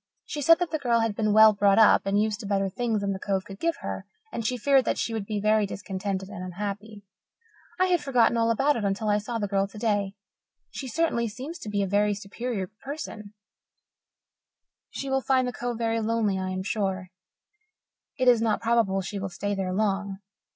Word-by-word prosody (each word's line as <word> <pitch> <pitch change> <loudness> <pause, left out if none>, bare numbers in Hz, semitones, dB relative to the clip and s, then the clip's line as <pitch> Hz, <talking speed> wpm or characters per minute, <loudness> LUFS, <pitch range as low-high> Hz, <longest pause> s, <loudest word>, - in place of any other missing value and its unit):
She 295 - -5
said 330 +4 +6
that 355 -2 -2
the 315 - -1
girl 235 -4 +2
had 225 -2 -1
been 215 -1 +1
well 215 +1 +8
brought 200 -1 +3
up 220 -2 +5
and 200 +1 +2
used 215 -1 0
to 215 - -6
better 195 -1 0
things 220 +1 -1
than 200 0 -1
the 190 - -6
Cove 195 -1 -1
could 195 -1 -10
give 335 0 0
her, - - -5 0.2
and 230 - -4
she 250 +3 -1
feared 270 +2 +4
that - - 0
she 230 - -2
would 215 -3 -3
be 210 -1 -2
very 215 0 +2
discontented 195 -1 -4
and 185 -2 -7
unhappy. 205 +3 -6 0.8
I 370 - +5
had 355 -3 +2
forgotten 250 -5 +3
all 230 0 +2
about 270 +6 +2
it 225 - -3
until 200 +2 -1
I 205 0 +3
saw 230 +3 -4
the 205 -2 -2
girl 195 0 +1
today. 205 -1 -1 0.6
She 270 - -6
certainly 255 -5 0
seems 270 +10 -7
to 215 - -7
be 205 -1 0
a - - -1
very 205 +1 +2
superior 205 +1 -4 0.2
person; 225 -8 -7 1.5
she 275 - -6
will 270 0 +1
find 260 -1 +2
the 250 - -3
Cove 240 -1 -3
very 230 0 0
lonely, 220 -3 0
I 185 0 -3
am 185 0 -3
sure. 190 -3 -2 1.1
It 255 - +1
is 240 -2 +6
not 220 -2 +1
probable 225 -4 +1
she 195 +2 -5
will 195 0 -4
stay 205 +3 -3
there 190 -2 -2
long. 200 0 -1
215 Hz, 210 wpm, -26 LUFS, 200-235 Hz, 1.5 s, well